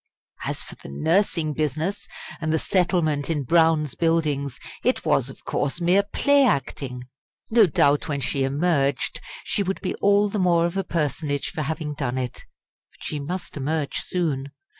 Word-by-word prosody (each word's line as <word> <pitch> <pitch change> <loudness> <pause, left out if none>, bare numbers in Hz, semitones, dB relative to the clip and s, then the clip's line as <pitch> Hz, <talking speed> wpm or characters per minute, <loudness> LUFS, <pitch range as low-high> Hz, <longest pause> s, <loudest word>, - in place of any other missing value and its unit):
As - - -2
for - - -10
the - - -12
nursing 160 - +1
business, 155 +6 -2 0.3
and 155 -1 0
the 160 - +3
settlement 170 -6 +1
in 150 -4 0
Brown's 160 -1 +3
Buildings, 150 -5 0 0.3
it - - +1
was, - - +2
of - - -13
course, 145 +4 -1
mere 180 +3 +4
play 280 +7 +3
acting. 135 - -1 0.5
No 220 -3 +6
doubt 145 -2 +3
when 145 -2 -1
she 135 +1 0
emerged 140 -1 0 0.2
she - - 0
would 190 0 -1
be 185 - -2
all 205 +1 +4
the 205 +1 -2
more 170 -2 +3
of 170 +2 -2
a 195 - 0
personage 150 -4 -1
for 155 - -3
having 155 0 -3
done 135 -3 -2
it. 125 -2 -4 0.5
But - - -16
she 150 - -3
must 175 +5 -5
emerge 145 +1 -1
soon. 145 -7 -1
155 Hz, 165 wpm, -24 LUFS, 140-180 Hz, 0.5 s, No